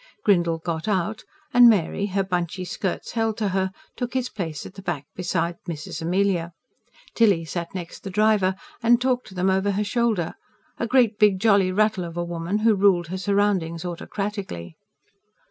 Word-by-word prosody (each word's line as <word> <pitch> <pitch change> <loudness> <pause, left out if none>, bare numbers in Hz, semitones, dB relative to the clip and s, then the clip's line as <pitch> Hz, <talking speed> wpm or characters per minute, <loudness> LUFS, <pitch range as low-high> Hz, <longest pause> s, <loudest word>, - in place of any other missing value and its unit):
Grindle 170 -4 +3
got 160 +1 -4
out, 210 +1 -1 0.3
and 245 -1 +9
Mary, 200 -1 +1
her 195 0 0
bunchy 180 -1 -2
skirts 190 0 -3
held 225 -2 0
to 210 -3 0
her, 190 0 0 0.3
took 245 0 -4
his 255 -1 0
place 165 -8 -5
at - - -10
the 195 - -10
back 160 -7 -3
beside 170 -1 -1
Mrs. 155 -1 -5
Amelia. 175 0 0 0.6
Tilly 200 -8 +3
sat 170 +3 -5
next 175 -2 -7
the 195 - -6
driver, 205 -1 +3 0.3
and 235 0 +5
talked 250 0 0
to 190 - -12
them 185 +1 +2
over 190 +1 +1
her 205 +2 0
shoulder 215 -6 0 0.5
a 235 - -1
great 235 -4 +3
big 205 -3 +4
jolly 200 -3 +4
rattle 210 -1 +2
of 170 0 -7
a 175 - 0
woman, 170 +3 -2
who 225 - +6
ruled 190 -4 +3
her 185 - -3
surroundings 190 -4 0
autocratically. 180 - -5
190 Hz, 175 wpm, -24 LUFS, 175-210 Hz, 0.6 s, and